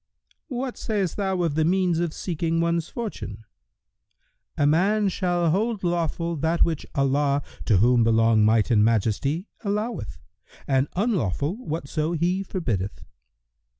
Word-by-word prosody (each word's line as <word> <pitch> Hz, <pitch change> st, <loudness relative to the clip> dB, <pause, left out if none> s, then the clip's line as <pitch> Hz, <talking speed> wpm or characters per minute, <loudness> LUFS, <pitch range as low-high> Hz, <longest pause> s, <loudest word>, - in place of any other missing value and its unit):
Q 260 Hz, -6 st, -5 dB
"What 255 Hz, 0 st, -3 dB
sayst 200 Hz, -6 st, -1 dB
thou 190 Hz, -3 st, -1 dB
of 165 Hz, -4 st, 0 dB
the 160 Hz, +1 st, +1 dB
means 180 Hz, 0 st, +2 dB
of 170 Hz, -2 st, 0 dB
seeking 165 Hz, -1 st, -2 dB
one's 170 Hz, 0 st, 0 dB
fortune?"—"A 145 Hz, -, -8 dB
man 195 Hz, +7 st, +3 dB
shall 175 Hz, -3 st, 0 dB
hold 215 Hz, +3 st, 0 dB
lawful 170 Hz, -1 st, -1 dB
that 160 Hz, +3 st, +2 dB
which 160 Hz, -3 st, -3 dB
Allah 140 Hz, +1 st, +1 dB, 0.2 s
(to 105 Hz, -, +4 dB
whom 120 Hz, +4 st, +4 dB
belong 115 Hz, -1 st, +4 dB
Might 110 Hz, +2 st, +3 dB
and 105 Hz, -3 st, +5 dB
Majesty!) 115 Hz, -, +1 dB, 0.2 s
alloweth, 210 Hz, -, -3 dB, 0.5 s
and 135 Hz, 0 st, +2 dB
unlawful 170 Hz, -, 0 dB
whatso 160 Hz, -, -3 dB
He 175 Hz, +4 st, 0 dB
forbiddeth." 120 Hz, -, -3 dB
165 Hz, 130 wpm, -24 LUFS, 135-185 Hz, 0.5 s, and